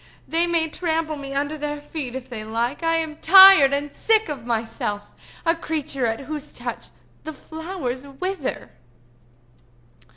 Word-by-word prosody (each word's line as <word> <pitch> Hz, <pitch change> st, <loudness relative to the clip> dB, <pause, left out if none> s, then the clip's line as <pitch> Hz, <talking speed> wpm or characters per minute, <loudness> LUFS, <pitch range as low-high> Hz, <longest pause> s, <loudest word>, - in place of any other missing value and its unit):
"They 335 Hz, +2 st, +1 dB
may 335 Hz, -2 st, +1 dB
trample 320 Hz, -1 st, -2 dB
me 275 Hz, -1 st, -7 dB
under 290 Hz, +2 st, -2 dB
their 295 Hz, 0 st, -3 dB
feet 290 Hz, -4 st, -6 dB
if 260 Hz, -1 st, -6 dB
they 225 Hz, -4 st, -7 dB
like. 230 Hz, +6 st, -2 dB
I 330 Hz, 0 st, +1 dB
am 320 Hz, -2 st, -2 dB
tired 380 Hz, -5 st, +8 dB
and 285 Hz, +1 st, -3 dB
sick 440 Hz, -4 st, +2 dB
of 260 Hz, -6 st, -6 dB
myself—a 225 Hz, +6 st, -3 dB
creature 290 Hz, -6 st, -2 dB
at 225 Hz, +2 st, -2 dB
whose 300 Hz, +1 st, -7 dB
touch -, -, -6 dB, 0.4 s
the 315 Hz, -, -6 dB
flowers 310 Hz, -4 st, -6 dB
wither!" 335 Hz, +2 st, -4 dB
295 Hz, 140 wpm, -23 LUFS, 260-325 Hz, 0.4 s, tired